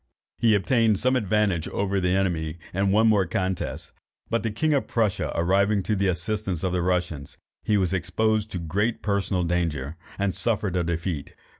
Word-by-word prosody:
He 115 -2 +4
obtained 110 +1 +2
some 130 +4 +2
advantage 105 -6 +1
over 100 0 -1
the 90 0 +1
enemy 85 -4 -1 0.2
in 95 +2 +1
one 110 +3 +4
more 100 -4 +3
contest, 95 +1 -2 0.4
but 115 - +1
the 115 - -1
king 150 +9 0
of 140 - +1
Prussia 110 -5 0
arriving 100 +4 +2
to 105 - 0
the 100 0 +1
assistance 95 0 -1
of 95 -1 0
the 90 - +1
Russians, 90 -5 -2 0.2
he 105 - +1
was 95 -2 +1
exposed 110 +4 0
to 95 - -4
great 100 +8 -1
personal 100 -3 0
danger, 85 -4 -1 0.2
and 100 -2 0
suffered 105 -5 -1
a 90 - +1
defeat. 85 -2 -3
95 Hz, 175 wpm, -25 LUFS, 90-105 Hz, 0.4 s, He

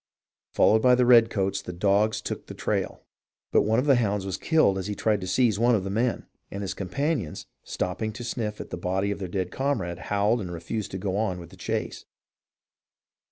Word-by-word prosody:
Followed 110 +1 +4
by 125 +1 +6
the 125 0 +3
redcoats 115 -5 +4
the 90 - -7
dogs 105 +4 +1
took - - -5
the - - -8
trail, - - -2 0.5
but - - +5
one 110 +2 +1
of 125 - +2
the 140 -3 +5
hounds 105 -4 0
was 95 - -2
killed 155 -13 +2
as 95 - -4
he 105 - -3
tried 105 -2 +1
to 95 - -5
seize 110 +1 +2
one 120 +1 +4
of 100 - -1
the 95 - -4
men, 115 +4 0 0.2
and 100 +1 -5
his 95 - -3
companions, 125 - -2 0.2
stopping 95 +5 -3
to 120 - -7
sniff 110 -3 -3
at - - -8
the - - -3
body 95 +1 -1
of 100 - -4
their 95 - -4
dead 90 0 -3
comrade, 95 -11 -2
howled 105 +3 +2
and 90 -3 -5
refused 85 +5 -4
to 95 - -5
go 95 0 -2
on 100 -4 -1
with 85 - -11
the - - -13
chase. - - -4
105 Hz, 210 wpm, -26 LUFS, 95-115 Hz, 0.5 s, by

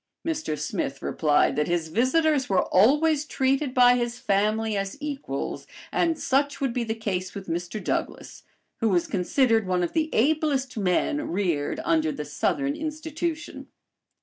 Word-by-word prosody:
Mr. 310 - -2
Smith 140 -1 -3
replied 150 -2 +2
that 150 - 0
his 170 -2 -1
visitors 265 - +2
were 190 -2 +3
always 295 - +4
treated 270 -1 0
by 245 -1 +6
his 240 0 -2
family 215 +2 0
as 195 +5 -3
equals, 275 - -5 0.2
and 330 -2 +1
such 280 +2 0
would 270 -4 -1
be 245 - -1
the 220 -1 -3
case 190 -4 -3
with 195 -1 -6
Mr. 175 +5 -3
Douglass, - - -3 0.4
who 225 - +1
was 180 -3 +2
considered 225 +3 +1
one 180 -1 +1
of 175 - -2
the 320 -1 +1
ablest 280 0 +1
men 215 - 0
reared 170 -6 -1
under 160 -1 +2
"The 150 0 -5
Southern 140 -1 -1
Institution." 315 +2 -4
225 Hz, 150 wpm, -25 LUFS, 180-290 Hz, 0.4 s, by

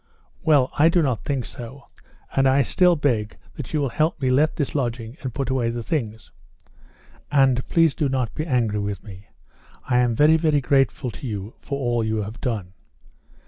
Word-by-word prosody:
"Well, 145 -5 +3
I 160 +3 +6
do 170 0 +2
not 125 -7 -1
think 135 -4 -1
so. 125 +3 -9 0.5
And 135 0 +4
I 135 +1 +4
still 180 +7 +3
beg 120 -8 -1 0.2
that 145 - -7
you 155 - 0
will 140 -2 0
help 155 +6 0
me 130 -2 +1
let 150 +5 +3
this 145 -4 -2
lodging 120 -4 -3
and 130 - -4
put 135 +2 -3
away 125 -3 +1
the 120 0 -4
things. 110 -6 -4 1.0
And 135 -3 +3
please 165 -3 +3
do 145 -1 -1
not 130 -4 -1
be 155 - -3
angry 115 -7 +1
with 100 -2 -4
me. 100 -1 -12 0.6
I 125 -1 +1
am 120 -2 +2
very, 155 +5 +5
very 155 -2 +2
grateful 135 -1 +1
to 130 - -8
you 105 -1 -5
for 140 - -4
all 120 -3 0
you 110 -1 -1
have 110 +4 -8
done." 105 -8 -3
130 Hz, 190 wpm, -23 LUFS, 115-145 Hz, 1.0 s, I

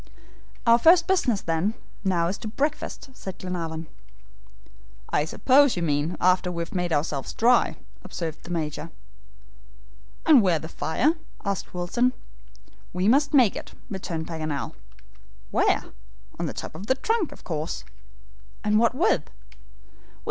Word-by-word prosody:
"Our 235 0 +6
first 335 +4 +6
business, 280 - +2
then, 165 +7 0 0.3
now 180 -4 +2
is 185 - -3
to - - -6
breakfast," 280 +3 -3
said 190 -7 -8
Glenarvan. 165 -3 -4 1.3
"I 150 - +2
suppose 265 - +4
you 175 - -1
mean 150 +2 0
after 180 0 +3
we 170 -1 -2
have - - -9
made 180 -2 -1
ourselves 145 -3 -1
dry," 240 +2 +3 0.3
observed 160 -2 -5
the - - -11
Major. 160 -4 -3 1.4
"And 300 -6 +8
where's 175 -6 +2
the 160 - -6
fire?" 270 - +1 0.3
asked 200 -2 -3
Wilson. 240 +9 +1 0.8
"We 180 +2 +1
must 285 +5 +4
make 245 -7 +5
it," - - -8 0.2
returned 170 -4 -4
Paganel. 155 -4 -4 0.8
"Where?" - - +2 0.6
"On - - -1
the - - -4
top - - -6
of 185 +6 -8
the 260 - +3
trunk, 430 - 0
of - - -13
course." 155 - -3 0.8
"And 210 0 +3
what 235 +1 +3
with?" 260 - +2
185 Hz, 140 wpm, -25 LUFS, 165-250 Hz, 1.4 s, And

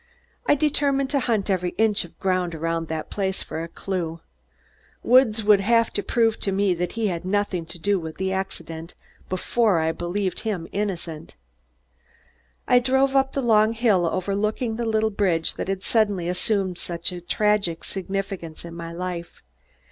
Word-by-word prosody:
I - - +6
determined 280 -2 +1
to 280 - +2
hunt 225 -6 0
every 180 -3 0
inch 215 -3 +2
of 170 - -17
ground 185 -3 0
around 165 +1 -2
the 160 0 -3
place 190 -2 -2
for 160 - -5
a 165 - -4
clue. 170 -2 -4 0.8
Woods 235 -3 +5
would 205 -1 +5
have 230 +2 +3
to 205 - 0
prove 225 0 +1
to 195 - -1
me 195 -1 +2
that 175 +1 -3
he 230 -1 -1
had 170 -1 -3
nothing 185 -3 -1
to 170 - -7
do 200 +3 +1
with 160 -1 -7
the 190 0 -1
accident 165 -3 -5 0.3
before 200 +2 +2
I'd 160 0 -1
believe 185 +2 -1
him 190 -7 -3
innocent. 175 -6 -4 1.3
I 250 - +6
drove 265 +2 +2
up 270 0 +3
the 275 - -1
long 220 -1 +4
hill 215 -7 +3
overlooking 205 +6 -1
the 235 +1 -2
little 220 0 +2
bridge 180 -6 +1
that - - -4
had 195 0 -2
suddenly 205 -6 +1
assumed 185 0 0
such 170 +1 -2
a 175 -1 -6
tragic 200 -2 +1
significance 190 -4 -4
in 170 - -8
my 170 0 -6
life. 175 0 -6
195 Hz, 170 wpm, -24 LUFS, 175-220 Hz, 1.3 s, I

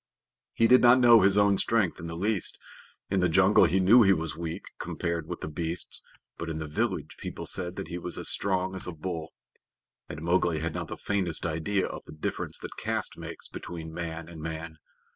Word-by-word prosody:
He 115 - +3
did 125 +2 +7
not 120 +1 +7
know 120 -2 +7
his 100 +1 +4
own 100 -1 +4
strength 110 -7 +1
in 85 - -6
the 85 - -6
least. 100 +1 +2 0.5
In 95 - +2
the 90 -1 +2
jungle 95 +4 +5
he 95 - +2
knew 105 +7 +7
he 95 -3 +6
was 80 -3 -2
weak 85 +2 -5 0.2
compared 85 -2 -3
with - - -6
the - - -4
beasts, 80 +2 -2 0.4
but 85 - -4
in 80 - -3
the 80 - -4
village 85 -2 -2
people - - -6
said 90 -1 -3
that - - -6
he 85 0 -4
was 90 0 -4
as - - 0
strong 95 -1 0
as 95 - -2
a 90 - -4
bull. 80 0 -5 0.8
And 75 - -7
Mowgli 85 -1 +2
had 80 +1 -3
not - - -4
the - - -7
faintest 95 -6 -1
idea 85 +5 0
of - - -6
the - - -11
difference 75 - -3
that - - -8
caste - - -2
makes - - -8
between 80 -2 -8
man 80 -1 -5
and 85 -2 -10
man. 80 0 -6
85 Hz, 210 wpm, -28 LUFS, 80-95 Hz, 0.8 s, did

